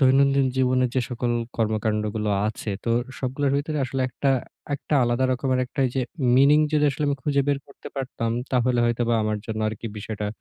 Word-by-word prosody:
দৈনন্দিন 135 +1 +4
জীবনে 130 0 +3
যে 130 - +3
সকল 120 0 -1 0.3
কর্ম-কান্ডগুলো 105 -1 0 0.2
আছে, 110 0 -5
তো 115 - 0 0.3
সবগুলোর 135 +2 -1
ভিতরে 150 +1 -2
আসলে 130 +1 -3
একটা, 135 +2 0 0.4
একটা 145 +2 -3
আলাদা 120 +2 +1
রকমের 130 0 0
একটা 125 - -5
এই - - -3
যে - - +2 0.4
মিনিং 140 +3 +6
যদি 150 -1 +3
আসলে 140 +2 -2
আমি 140 - 0
খুঁজে 140 -1 +2
বের 140 -1 +2
করতে 140 - -11
পারতাম, 130 -4 -2 0.2
তাহলে 125 -1 +2
হয়তোবা 120 0 +1
আমার 105 0 -1
জন্য 110 -1 -3
আরকি 110 +2 -6
বিষয়টা 105 0 -4
130 Hz, 180 wpm, -24 LUFS, 115-140 Hz, 0.4 s, মিনিং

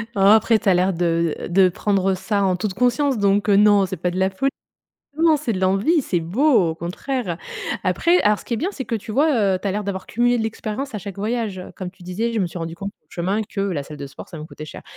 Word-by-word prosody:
Oh, - - -2
après, 215 +3 +5
tu 210 - 0
as - - +6
l'air 185 +2 +2
de, 170 -2 0
heu, - - -6
de 185 +1 +5
prendre 195 +1 0
ça 200 +2 -1
en 185 -1 +2
toute 195 +1 -3
conscience 250 +4 +1
donc 200 0 +2
heu, 200 - +5
non, 205 -1 +5
c'est 190 0 -5
pas 180 +2 -1
de 180 - -5
la 190 0 +3
fol 195 +9 0 0.7
non, 320 -1 +4
c'est 260 -5 -2
de 185 - -3
l'envie, 195 - +2
c'est 180 - 0
beau, 205 - +3
au - - -4
contraire. 180 +3 -4 0.5
Après 330 - +3
alors, 210 0 +3
ce - - -15
qui 235 - -2
est - - -1
bien, 345 - -1
c'est 265 - -5
que 230 - -2
tu 215 - -8
vois, 235 -8 +3
heu, - - -1
tu - - -3
as - - +1
l'air 210 +2 -2
d'avoir 190 -1 -4
cumulé 245 +2 +2
de 230 - -1
l'expérience 220 +4 -4
à - - -2
chaque 200 -1 -8
voyage. 210 -2 -2
Comme 185 - -5
tu 185 0 -19
disais: 200 +7 -2
«Je 220 - +1
me 185 - +1
suis 175 - -7
rendu 165 0 -5
compte, 195 +4 -5 0.2
sur 170 - -6
le - - -2
chemin, 200 +3 +1
que 200 - -4
la 185 -7 -1
salle 150 +1 -9
de 140 -1 -6
sport, - - -11
ça - - -9
me 155 - -7
coûtait 155 -1 -9
cher». - - -10
200 Hz, 280 wpm, -21 LUFS, 180-230 Hz, 0.7 s, as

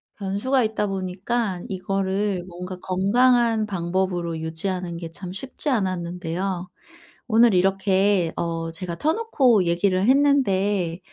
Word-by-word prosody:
변수가 210 +7 0
있다 215 -1 -1
보니까 190 +1 -2
이거를 195 0 -1
뭔가 180 +1 -7
건강한 225 +4 +2
방법으로 175 -3 -2
유지하는 170 +2 -3
게 165 -1 -7
참 180 +1 -8
쉽지 270 +7 -3
않았는데요. 180 -3 -2 0.6
오늘 230 -1 +5
이렇게 195 -1 +2
어 165 -1 -2
제가 170 +1 -5
터놓고 290 - +2
얘기를 185 +4 +1
했는데 205 - +2
190 Hz, 270 characters per minute, -23 LUFS, 180-215 Hz, 0.6 s, 오늘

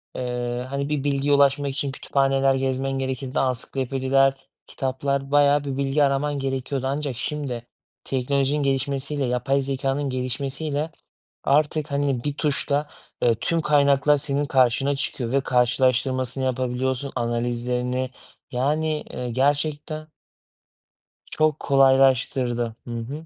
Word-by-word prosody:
eee, 125 0 -3
hani 140 +1 -2
bir 145 -2 -1
bilgiye 140 0 +1
ulaşmak 140 0 +3
için 140 0 -2
kütüphaneler 135 0 +1
gezmen 135 0 -1
gerekirdi 130 0 -2
ansiklopediler, 135 +1 +1 0.3
kitaplar 135 +1 -2
bayağı 145 0 +4
bir 135 -2 -4
bilgi 140 +2 +2
araman 140 +1 +1
gerekiyordu 135 0 -2
ancak 140 -2 -2
şimdi, 135 -4 -3 0.4
teknolojinin 140 +2 0
gelişmesiyle 140 +1 -1
yapay 125 +3 +1
zekânın 135 +1 -1
gelişmesiyle 135 +4 -2 0.5
artık 150 +1 +2
hani 140 -3 0
bir 145 -1 -1
tuşla, 145 0 0 0.3
eee, 120 -1 +4
tüm 165 +9 -1
kaynaklar 145 -1 +4
senin 145 0 -1
karşına 135 +1 +2
çıkıyor 135 -4 -3
ve 140 - +3
karşılaştırmasını 130 +1 +1
yapabiliyorsun 130 +1 -1
analizlerini 120 +2 -1 0.4
yani, 150 +4 0
eee, 125 -1 -4
gerçekten. 145 +4 -1 1.2
Çok 155 -1 +1
kolaylaştırdı. 130 -3 +3
Hı 120 -1 -4
hı. 140 +8 -6
135 Hz, 115 wpm, -24 LUFS, 130-145 Hz, 1.2 s, bayağı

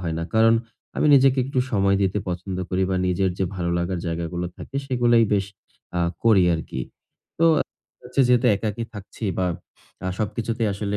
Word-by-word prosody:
হয় 85 -3 -3
না। 85 - -2
কারণ 115 +1 +6 0.4
আমি - - +2
নিজেকে 135 -1 +5
একটু 135 0 -2
সময় 100 -2 +3
দিতে 95 +2 +1
পছন্দ 90 +1 -4
করি 95 +1 +1
বা 95 - +1
নিজের 95 +1 +1
যে 95 - +1
ভালো 85 -2 -2
লাগার 85 +1 -2
জায়গাগুলো 85 +1 -3
থাকে 140 - -8
সেগুলোই 120 -3 +3
বেশ 100 -2 +2 0.5
আ - - +1 0.2
করি 110 -5 +6
আরকি। 80 -5 -5 0.6
তো 165 - +3 0.6
হচ্ছে 125 +2 -1
যেহেতু 125 0 +4
একাকী 110 +2 -3
থাকছি 105 +2 -8
বা 90 - +1 0.6
আ - - -1
সবকিছুতেই 115 +1 -1
আসলে 100 +1 -2
100 Hz, 170 wpm, -23 LUFS, 90-115 Hz, 0.6 s, কারণ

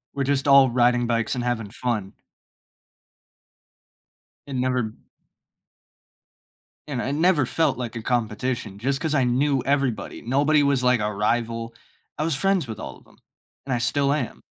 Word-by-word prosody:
We're 140 - 0
just 140 0 0
all 140 -1 +7
riding 120 0 +3
bikes 115 +1 0
and 125 - -2
having 120 -4 -2
fun. 110 -3 -3 2.3
It 140 - -5
never 125 -3 0 1.9
and 135 -5 -3
it 135 +3 -2
never 160 -3 +3
felt 160 +3 0
like 120 -2 -5
a 115 - -4
competition 115 -2 -2
just 135 +5 -1
'cause 155 -2 0
I 135 - +3
knew 130 +2 +1
everybody. 135 -4 -1
Nobody 145 +5 +2
was, 140 -2 +1
like, 125 -1 +3
a 105 0 -1
rival, 115 +2 -1 0.4
I 150 - -1
was 160 -2 0
friends 190 0 +1
with 110 -2 -7
all - - -7
of - - -23
'em, - - -22 0.5
and 135 - -2
I 120 - 0
still 140 +3 +1
am. 140 -6 -4
125 Hz, 155 wpm, -24 LUFS, 115-140 Hz, 2.3 s, all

